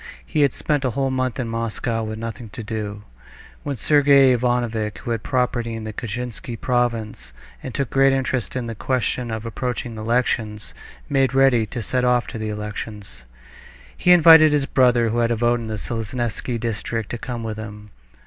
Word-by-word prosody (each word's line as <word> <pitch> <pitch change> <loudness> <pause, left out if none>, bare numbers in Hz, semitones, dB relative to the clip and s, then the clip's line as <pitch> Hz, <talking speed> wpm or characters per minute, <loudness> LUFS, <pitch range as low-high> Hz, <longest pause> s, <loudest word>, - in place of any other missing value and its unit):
He 155 - 0
had 140 -2 +4
spent 145 +1 -1
a 130 - +1
whole 135 +2 -1
month 130 0 -1
in 125 - -2
Moscow 115 0 -2
with 110 0 -4
nothing 115 0 -6
to 115 - -6
do, 105 -1 -5 0.6
when 145 -1 -3
Sergey 140 -1 +5
Ivanovitch, 120 -3 0
who 120 - -5
had 115 -2 -1
property 120 -3 -1
in 110 - -6
the 110 0 -6
Kashinsky 120 +1 -5
province, 115 - -1 0.3
and 130 - -6
took 140 0 -3
great 135 0 +4
interest 130 -2 -1
in 125 -2 -2
the 115 - -4
question 125 +1 -1
of 110 -1 -4
the 115 - -4
approaching 120 0 -4
elections, 110 - -1 0.3
made 135 -2 +1
ready 130 -5 +4
to 120 +2 -5
set 125 +3 -1
off 125 -1 +3
to 115 - -6
the 110 0 -3
elections. 105 - -7 0.7
He 180 - +3
invited 160 -3 +8
his 145 -2 +2
brother, 125 -4 +3
who 115 +2 0
had 115 -1 +2
a 120 - +1
vote 120 +1 +2
in 115 - -6
the 110 -1 -3
Seleznevsky 115 +2 -3
district, 115 -1 -3
to 120 - -4
come 120 -2 -5
with 110 -1 -4
him. 105 -1 -9
120 Hz, 185 wpm, -22 LUFS, 110-130 Hz, 0.7 s, invited